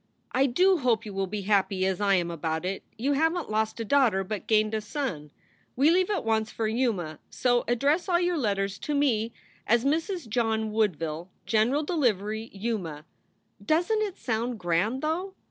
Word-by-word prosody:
I 270 +2 +3
do 365 +8 +3
hope 235 -4 +1
you 210 - -7
will 195 0 -1
be 205 +1 -4
happy 195 -1 +2
as 190 0 -1
I 200 -1 +4
am 175 -2 0
about 160 0 -3
it. 190 +1 -2 0.2
You 270 +6 +1
havent 325 0 0
lost 220 +1 0
a 230 - -2
daughter 230 -7 +3
but 210 +2 -5
gained 215 -1 +3
a 220 - 0
son. 210 - -4 0.5
We 285 +5 +4
leave 370 +2 +3
at 400 - -1
once 220 -1 +1
for 225 - -2
Yuma, 215 - -1
so 245 -1 +1
address 285 - +1
all 345 -1 +4
your 350 -2 +1
letters 200 -4 -1
to 295 - -2
me 235 -6 +1 0.4
as 235 +3 +3
Mrs. 325 - -1
John 220 -1 0
Woodville, 175 -6 -1 0.2
General 235 +7 +2
Delivery, 220 - 0
Yuma. 190 -8 -4 0.6
Doesnt 350 +8 +2
it 405 -4 -2
sound 235 0 -2
grand, 200 - 0
though? 360 +5 -2
225 Hz, 180 wpm, -27 LUFS, 200-285 Hz, 0.6 s, I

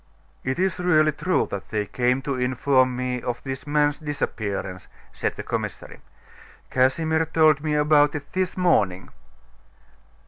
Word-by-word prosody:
"It 130 +1 -2
is 185 0 0
really 155 -4 +3
true 185 +4 0
that 100 -1 -6
they 105 -1 -1
came 125 +5 0
to 140 - -2
inform 130 0 +2
me 125 0 -2
of 120 0 -4
this 135 +1 -6
man's 145 0 +1
disappearance," 100 - -4 0.2
said - - -3
the - - -6
commissary. - - -5 0.7
"Casimir 160 +5 +2
told 155 -2 +4
me 155 -1 0
about 150 0 +4
it 145 -1 -7
this 185 0 -1
morning." 100 - +1
145 Hz, 140 wpm, -24 LUFS, 125-155 Hz, 0.7 s, told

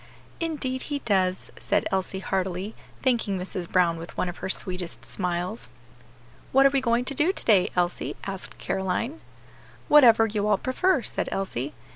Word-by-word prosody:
"Indeed 285 -6 -2
he 290 - 0
does," 185 -3 +1
said - - +1
Elsie 190 0 -1
heartily, 190 +2 -2 0.3
thanking 230 -6 +1
Mrs. 180 -1 -5
Brown 175 -2 +3
with 165 +1 -9
one 180 - 0
of 175 - -7
her - - -5
sweetest 180 -2 -3
smiles. 180 +3 -3 0.8
"What 270 +1 +5
are 275 - +6
we 275 -1 +2
going 235 0 +1
to 275 - 0
do 300 +7 +2
to - - -6
day, 200 -5 +5
Elsie?" 175 -1 -1
asked 195 -1 -6
Caroline. 230 - -2 0.7
"Whatever 235 -7 +7
you 210 -1 -1
all 210 -2 +4
prefer," 270 - +1
said - - -2
Elsie. 145 -8 -3
195 Hz, 160 wpm, -26 LUFS, 185-255 Hz, 0.8 s, Whatever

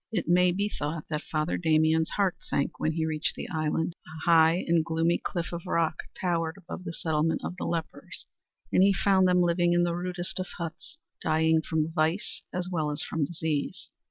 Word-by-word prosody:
It 190 -8 -1
may 180 +1 +5
be 200 +3 0
thought 155 -5 -4
that 150 0 -1
Father 155 +1 -1
Damien's 160 -1 +3
heart 195 -3 +1
sank 140 - -2
when 155 - +1
he 160 0 0
reached 155 -1 0
the - - -5
island. 160 0 -1
A 155 0 -8
high 165 +2 +5
and 165 -1 +3
gloomy 165 +1 +1
cliff 170 -1 -3
of 170 +1 -6
rock 165 -3 +1 0.2
towered 165 -2 0
above 185 0 -8
the 170 - -3
settlement 160 -1 0
of - - -4
the - - -3
lepers, 165 -2 -4 0.5
and - - +5
he 195 +1 +6
found 190 -1 +4
them 180 0 +4
living 175 0 +3
in 175 0 +4
the 175 -1 +1
rudest 180 +1 -3
of 185 - -2
huts, 170 - -7 0.2
dying 160 0 +3
from 160 0 -1
vice 160 +4 0
as 180 0 -3
well 160 -5 -1
as 145 - -3
from 160 -3 -1
disease. 155 -2 -3
165 Hz, 195 wpm, -28 LUFS, 160-180 Hz, 0.5 s, he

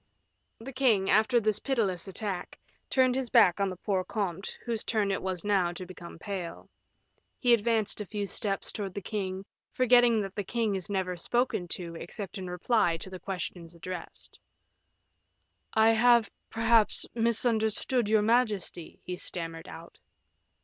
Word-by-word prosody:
The 260 +4 -9
king, 230 -7 +2
after 230 +3 +4
this 215 -2 +1
pitiless 205 - -1
attack, 195 -1 -4 0.3
turned 260 -1 +3
his 260 -1 -2
back 205 -7 +5
on 200 - +2
the 185 - -4
poor 190 0 -1
comte, 195 -2 -4
whose 230 -2 -2
turn 210 -3 0
it 195 - -1
was 185 -2 -3
now 195 -4 +2
to 185 - -7
become 175 -2 -11
pale; 185 -1 -6 0.7
he 245 -2 +4
advanced 220 -2 +1
a - - -4
few 205 0 -3
steps 200 0 -1
towards 195 -3 -5
the 200 - -3
king, 190 -2 -4 0.3
forgetting 245 -2 +4
that 195 -1 -6
the 205 - -3
king 225 +1 -1
is 190 -1 -4
never 190 -2 -1
spoken 235 0 -1
to 170 -1 -3
except 190 +4 -7
in 185 -1 -6
reply 180 -1 +1
to 185 +2 -7
questions 175 -3 -6
addressed. 180 +1 -6 1.4
"I 220 +1 +6
have 235 -1 +4 0.2
perhaps 225 -1 +3
misunderstood 230 0 +2
your 215 -1 +4
majesty," 215 -7 0
he 180 - -4
stammered 165 -2 -4
out. - - -11
205 Hz, 150 wpm, -29 LUFS, 185-230 Hz, 1.4 s, I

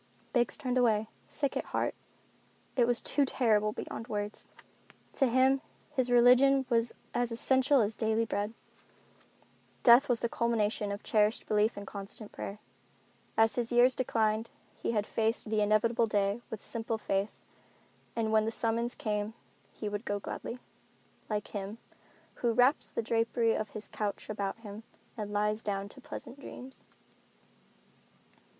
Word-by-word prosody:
Biggs 240 -2 +2
turned 255 -4 0
away, 220 -3 +3 0.2
sick 280 -2 -2
at - - -1
heart. - - -1 0.8
It 240 -3 +4
was 240 -1 +1
too 290 - +2
terrible 215 -5 +2
beyond 225 +1 -6
words. 210 -2 -4 0.7
To 270 - +3
him 260 +2 +4 0.3
his 260 -4 0
religion 250 +3 +6
was 230 -1 +2 0.2
as 240 -1 0
essential 265 +3 +3
as 210 0 0
daily 220 +1 +1
bread. 210 +1 -2 1.3
Death 245 +4 +7
was 240 -2 +3
the 235 - +1
culmination 220 -3 0
of 200 - -5
cherished 215 +1 +2
belief 210 +1 +2
and 205 - -6
constant 200 +2 -8
prayer. 200 - -6 0.8
As 225 0 +5
his 240 -1 -1
years 245 +2 +6
declined 225 -3 0 0.3
he - - -2
had 210 -2 +1
faced 225 0 -1
the 215 -1 +2
inevitable 220 +2 +3
day 205 +1 +1
with 220 - -6
simple 225 0 -3
faith 195 -1 -1 0.8
that 230 -1 0
when 220 0 +3
the - - +1
summons 230 +2 -1
came 210 0 -2 0.4
he 215 - -6
would 205 +1 -3
go 205 -3 -2
gladly, 230 +4 -6 0.7
like 210 -1 -2
him 205 +1 -5 0.6
"who 235 -2 +2
wraps 250 +5 +4
the - - -2
drapery 230 0 +2
of 215 - -2
his 210 - -8
couch 210 0 -4
about 200 -1 -3
him 210 -1 -8 0.3
and 210 -2 -5
lies 210 +1 0
down 200 -2 -2
to 265 - -12
pleasant 260 +1 -8
dreams." 265 -1 -10
225 Hz, 150 wpm, -31 LUFS, 210-245 Hz, 1.3 s, Death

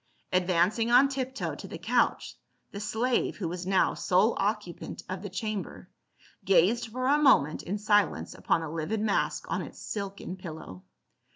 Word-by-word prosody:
Advancing 185 +5 +2
on 250 +3 +7
tiptoe 265 -1 -3
to - - -8
the - - -7
couch - - 0 0.4
the 200 - -6
slave, 225 +4 0
who 185 - -3
was 175 +2 -5
now 190 -1 +3
sole 190 +6 +2
occupant 205 -4 -3
of 185 0 -5
the 205 - -6
chamber, 205 +2 -5 0.5
gazed 195 +6 +3
for 255 +3 -4
a 285 +3 +4
moment 155 - +4
in 200 +4 -3
silence 205 -1 +1
upon 165 - 0
the 160 - -5
livid 165 +7 -2
mask 210 -1 0
on - - -1
its - - -9
silken 200 -2 -5
pillow. 160 - -9
200 Hz, 160 wpm, -28 LUFS, 180-225 Hz, 0.5 s, on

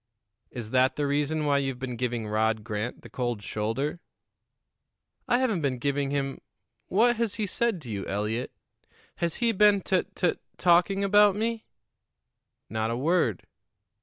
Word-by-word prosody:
"Is 115 -3 -7
that 130 0 +3
the 145 - -1
reason 150 +2 0
why 140 -1 +3
you've 135 -2 -2
been 125 -1 -5
giving 120 -2 -2
Rod 110 0 +1
Grant 110 +1 -4
the - - -9
cold 120 -4 -2
shoulder?" 115 +12 -2 1.3
"I 240 - +3
haven't 235 -9 +1
been 135 -3 0
giving 140 +2 -1
him 135 -1 -2 0.5
What 235 +4 +3
has 230 -3 -1
he 215 - -1
said 225 0 0
to 120 - -9
you, 100 -2 -4
Eliot? 105 +5 -2 0.7
Has 170 -1 -1
he 235 -1 +2
been 205 -1 +5
tut 185 0 -1
tut 180 -3 0 0.2
talking 180 +3 +3
about 205 0 +5
me?" 225 +1 -2 1.0
"Not 110 0 -2
a 115 - -1
word." 140 - +1
140 Hz, 155 wpm, -27 LUFS, 120-195 Hz, 1.3 s, been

